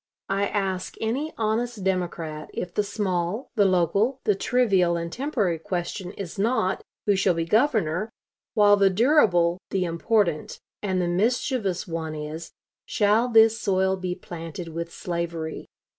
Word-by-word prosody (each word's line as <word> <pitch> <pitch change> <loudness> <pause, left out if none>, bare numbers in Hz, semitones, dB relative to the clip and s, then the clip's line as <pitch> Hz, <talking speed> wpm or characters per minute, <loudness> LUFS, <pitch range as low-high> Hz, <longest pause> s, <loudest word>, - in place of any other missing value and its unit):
I 195 +1 +1
ask 190 -3 -2
any 265 +8 -1
honest 225 0 -1
Democrat 170 -5 -2
if 175 - -4
the 210 - +2
small, 200 +1 -2
the 210 -5 +3
local, 195 - +2
the 210 - +3
trivial 195 -6 +2
and 170 0 -4
temporary 225 - -1
question 180 0 -4
is 195 -2 -7
not, 210 -3 +1 0.2
Who 205 - +3
shall 190 -2 +2
be 165 0 -1
governor? 215 - +1 0.5
while 205 -2 +6
the 200 -1 +5
durable, 185 - +3
the 190 -2 0
important, 170 -1 0 0.2
and 190 -3 0
the 180 - 0
mischievous 205 - 0
one 160 -2 -4
is, 155 +2 -6 0.4
Shall 215 +3 +3
this 225 -1 +5
soil 190 -1 +2
be 185 -1 -3
planted 170 -1 -7
with 170 +1 -5
slavery? 170 -2 -4
190 Hz, 145 wpm, -25 LUFS, 170-215 Hz, 0.5 s, while